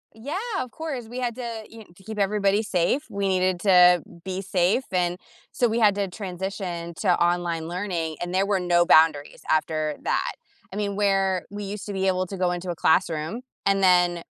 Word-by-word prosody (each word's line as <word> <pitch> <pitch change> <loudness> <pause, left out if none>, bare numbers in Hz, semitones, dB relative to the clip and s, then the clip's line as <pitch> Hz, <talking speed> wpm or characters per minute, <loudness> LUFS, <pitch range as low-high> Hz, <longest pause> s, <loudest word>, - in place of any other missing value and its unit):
Yeah, 265 +10 -5 0.2
of 255 - -4
course, 275 -8 -5
we 245 +2 -6
had 240 -2 -2
to, 235 -3 -5
you 225 - -13
know, 220 - -12
to 190 - -19
keep 220 0 -7
everybody 200 0 +2
safe, 210 - 0
we 200 -2 -2
needed 185 -1 +1
to 180 -3 +6 0.2
be 190 0 -4
safe, 190 +5 +1
and 180 -1 0 0.3
so 245 - +1
we 230 +1 0
had 210 -3 +4
to 200 -1 -1
transition 180 -2 -5
to 185 -4 +2
online 175 -2 0
learning, 175 -3 -3
and 175 0 -4
there 190 +1 +2
were 200 -1 +1
no 175 -1 +3
boundaries 155 -3 +4
after 155 -1 0
that. - - 0 0.4
I - - -8
mean, 200 -1 -2
where 195 -2 +1
we 205 +1 -6
used 200 +1 -6
to 205 - -4
be 190 0 0
able 185 0 +1
to 195 - -7
go 180 -1 +1
into 180 +1 -4
a 175 - -2
classroom, 165 +5 +1 0.2
and 195 0 +2
then, 180 -2 +4
190 Hz, 200 wpm, -24 LUFS, 175-205 Hz, 0.4 s, to